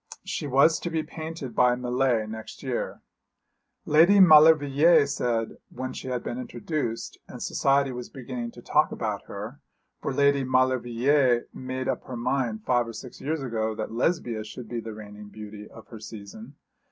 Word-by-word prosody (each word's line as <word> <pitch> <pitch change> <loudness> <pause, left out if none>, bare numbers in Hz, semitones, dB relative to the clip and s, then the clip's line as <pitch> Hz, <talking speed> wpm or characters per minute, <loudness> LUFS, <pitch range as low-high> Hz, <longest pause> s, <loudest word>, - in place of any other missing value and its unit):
She - - -3
was 140 +5 +4
to 175 - -4
be 160 -1 -1
painted 160 -6 -7
by 125 +1 +4
Millais 125 -2 +1
next 110 0 -9
year. - - -3 0.8
Lady 170 +7 +6
Maulevrier 155 -2 +7
said, 120 -5 -2
when 130 +1 -5
she - - -7
had 125 -1 -2
been 245 - -4
introduced, 155 - -4
and - - -10
society 140 0 +1
was 125 -1 -7
beginning 125 -2 -6
to 120 - -13
talk 150 - +2
about 105 -3 -3
her: 110 +8 -7 0.4
for - - -2
Lady 140 0 +3
Maulevrier 130 0 +2
made 130 0 -5
up 130 - -2
her 125 - -6
mind 120 -3 -1
five 120 -2 +2
or 115 - -7
six 120 +2 -10
years 150 0 -2
ago 110 -3 -2
that 110 0 -4
Lesbia 120 -3 -1
should 110 +2 -9
be 120 +1 -4
the 110 -1 -7
reigning 105 -1 -10
beauty 105 0 -9
of 115 - -14
her 115 - -9
season. 110 +4 -10
125 Hz, 165 wpm, -26 LUFS, 115-140 Hz, 0.8 s, Maulevrier